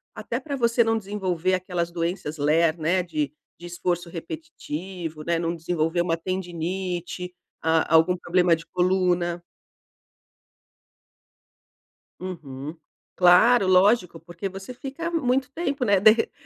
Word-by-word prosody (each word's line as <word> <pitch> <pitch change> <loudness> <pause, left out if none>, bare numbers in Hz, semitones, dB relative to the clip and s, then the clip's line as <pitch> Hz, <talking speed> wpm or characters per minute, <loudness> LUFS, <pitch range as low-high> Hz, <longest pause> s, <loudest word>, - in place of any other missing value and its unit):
até - - -3
para 285 -3 -5
você 235 -1 +3
não 225 0 +1
desenvolver 190 -3 -1
aquelas 180 -2 -2
doenças 170 -2 -3
LER, 155 +3 +2
né, 180 +3 +2
de 155 -5 -2 0.3
de 175 - -11
esforço 175 0 -2
repetitivo, 175 - -6
né, 170 0 0
não 170 0 -1
desenvolver 165 0 0
uma 165 -1 0
tendinite, 180 0 -4 0.3
ah, 160 0 +2
algum 180 +3 +4
problema 175 0 +2
de 165 0 -2
coluna. 180 -1 +1 2.8
Uhum. 155 -5 -7 0.4
Claro, 185 +4 +6
lógico, 185 -2 +4
porque 175 +3 -6
você 195 +6 -8
fica 280 +7 -5
muito 260 -4 0
tempo, 280 -5 -2
né, 200 -2 +4
de 215 +2 +8
re 225 +1 0
180 Hz, 125 wpm, -25 LUFS, 165-195 Hz, 2.8 s, de